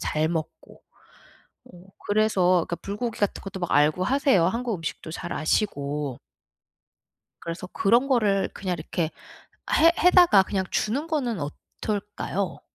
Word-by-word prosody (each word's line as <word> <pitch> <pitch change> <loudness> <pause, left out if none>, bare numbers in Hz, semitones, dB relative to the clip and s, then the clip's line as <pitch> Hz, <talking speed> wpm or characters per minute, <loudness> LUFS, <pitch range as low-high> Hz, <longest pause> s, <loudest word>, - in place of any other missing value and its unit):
잘 155 +1 0
먹고. 160 -2 -6 0.8
어 - - -20 0.4
그래서 215 -2 +2 0.3
그러니까 170 - -3
불고기 210 +3 -4
같은 205 - -1
것도 195 -1 -7
막 175 - -3
알고 150 +5 +3
하세요, 265 - +3
한국 230 +4 -1
음식도 160 -1 -6
잘 175 +1 -6
아시고. 145 - -1 1.2
그래서 170 +2 -6
그런 235 +9 +2
거를 210 -7 +2
그냥 185 -2 -3
이렇게 160 +1 -2 0.6
해 330 +2 +6
해다가 350 - +6
그냥 190 -1 -2
주는 275 +9 -1
거는 255 - -1
어떨까요? 200 +5 -4
195 Hz, 280 characters per minute, -25 LUFS, 165-230 Hz, 1.2 s, 해